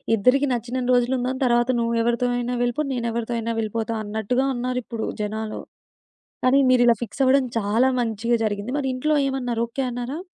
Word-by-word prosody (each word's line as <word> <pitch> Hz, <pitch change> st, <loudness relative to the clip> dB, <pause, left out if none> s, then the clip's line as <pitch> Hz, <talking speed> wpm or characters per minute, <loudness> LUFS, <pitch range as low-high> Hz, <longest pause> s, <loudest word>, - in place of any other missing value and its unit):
ఇద్దరికి 255 Hz, +7 st, +3 dB
నచ్చినన్ని 245 Hz, +2 st, -2 dB
రోజులుందాం. 250 Hz, +1 st, +1 dB
తర్వాత 240 Hz, 0 st, +2 dB
నువ్వెవరితో 235 Hz, +1 st, +1 dB
అయినా 245 Hz, +1 st, -2 dB
వెళ్ళిపో, 245 Hz, +5 st, 0 dB
నేనెవరితో 235 Hz, -1 st, -2 dB
అయినా 230 Hz, 0 st, -2 dB
వెళ్ళిపోతా 225 Hz, +1 st, -2 dB
అన్నట్టుగా 220 Hz, +5 st, -1 dB
ఉన్నారిప్పుడు 245 Hz, -2 st, -3 dB, 0.2 s
జనాలు, 215 Hz, +1 st, -4 dB, 0.8 s
కానీ 260 Hz, +2 st, +5 dB
మీరిలా 245 Hz, -2 st, +5 dB
ఫిక్సవ్వడం 265 Hz, +4 st, +2 dB
చాలా 220 Hz, +5 st, +2 dB
మంచిగా 230 Hz, +1 st, 0 dB
జరిగింది. 205 Hz, +4 st, -3 dB
మరింట్లో 265 Hz, +3 st, 0 dB
ఏమన్నారు, 250 Hz, -4 st, -1 dB
ఓకే 270 Hz, +3 st, -3 dB
అన్నారా? 245 Hz, +5 st, -4 dB
240 Hz, 135 wpm, -23 LUFS, 230-255 Hz, 0.8 s, కానీ